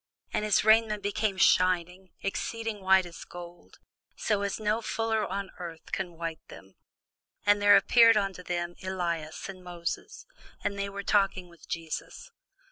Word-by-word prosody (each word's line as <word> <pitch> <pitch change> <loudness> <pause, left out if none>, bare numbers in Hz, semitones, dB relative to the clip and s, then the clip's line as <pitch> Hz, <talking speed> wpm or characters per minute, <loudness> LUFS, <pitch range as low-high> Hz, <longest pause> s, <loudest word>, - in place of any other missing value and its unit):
And - - 0
his 215 -2 +3
raiment 220 -1 +4
became 205 -1 -1
shining, 180 0 +2
exceeding 225 +1 -3
white 190 0 +5
as 170 -1 -10
snow; 175 0 -11 0.5
so 210 -2 0
as 200 +1 -2
no 215 +1 0
fuller 225 -1 -1
on 195 0 -4
earth 165 -2 -8
can 180 -3 -3
white 165 -1 -4
them. 95 0 -13 0.7
And 205 0 +4
there 205 0 +8
appeared 230 -2 +6
unto 195 -3 -1
them 175 -1 -3
Elias 170 -4 -3
with 195 -1 -8
Moses: 180 - -6 0.4
and 200 0 -2
they 200 0 -1
were 200 0 -6
talking 195 -3 +1
with 170 -1 -18
Jesus. 165 -1 -5
195 Hz, 150 wpm, -29 LUFS, 175-210 Hz, 0.7 s, there